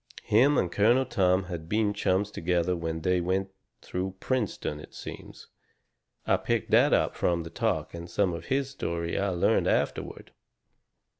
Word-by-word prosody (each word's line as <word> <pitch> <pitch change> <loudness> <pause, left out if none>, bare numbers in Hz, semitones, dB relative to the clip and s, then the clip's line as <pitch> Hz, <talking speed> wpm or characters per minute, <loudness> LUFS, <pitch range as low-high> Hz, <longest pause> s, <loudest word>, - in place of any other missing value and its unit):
Him 130 +8 +4
and 90 - +1
Colonel 120 +7 +3
Tom 95 -5 +2
had 85 -3 -7
been 105 -1 +1
chums 100 0 0
together 90 -1 0
when 80 -1 -3
they 90 +1 +1
went 95 +2 -1 0.3
through 95 +1 -4
Princeton, 110 - -2
it 75 - -13
seems - - -10 0.8
I - - +3
picked - - -2
that - - +5
up - - +2
from 85 -1 0
the 80 - -9
talk - - -1
and 85 0 -7
some 95 0 +1
of 85 0 -6
his 135 0 0
story 85 -9 -3
I 100 0 0
learned 90 -2 +2
afterward. - - -1
90 Hz, 160 wpm, -28 LUFS, 85-105 Hz, 0.8 s, that